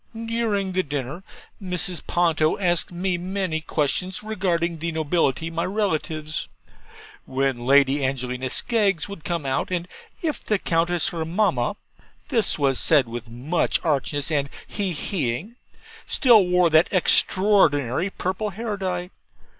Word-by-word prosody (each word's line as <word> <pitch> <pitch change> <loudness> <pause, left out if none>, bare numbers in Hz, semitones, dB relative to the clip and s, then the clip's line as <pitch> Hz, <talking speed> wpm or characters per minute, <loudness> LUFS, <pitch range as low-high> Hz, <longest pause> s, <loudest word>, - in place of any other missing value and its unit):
During 225 -4 -1
the 185 0 +1
dinner 145 +1 -5 0.4
Mrs. 180 -2 -3
Ponto 165 -3 +2
asked 175 -4 0
me 180 0 -1
many 185 -3 -2
questions 165 +6 -1
regarding 175 -6 -1
the 165 +1 -2
nobility, 160 -1 0
my 165 +1 -2
relatives. 160 -6 -2 0.8
'When 130 -2 -1
Lady 140 0 +4
Angelina 130 -1 -2
Skeggs 200 - +1
would 200 -6 -9
come 170 -4 -3
out; 135 0 -1
and 180 -1 -2 0.4
if 310 -3 -2
the 210 - +1
countess 170 -1 +1
her 165 -2 -3
mamma' 170 - 0 0.5
(this 230 -6 +3
was 135 -3 +1
said 145 -6 +4
with 120 0 -7
much 130 +9 0
archness 145 -1 0
and 140 -2 0 0.2
he 200 -3 -2
he 145 - -1
ing) 215 - -12 0.5
'still 225 -8 +5
wore 180 -2 +3
that 160 +2 +5
extraordinary 185 - +3
purple 190 +3 -3
hair 210 +1 -4
dye?' 180 -1 -3
170 Hz, 135 wpm, -23 LUFS, 145-190 Hz, 0.8 s, still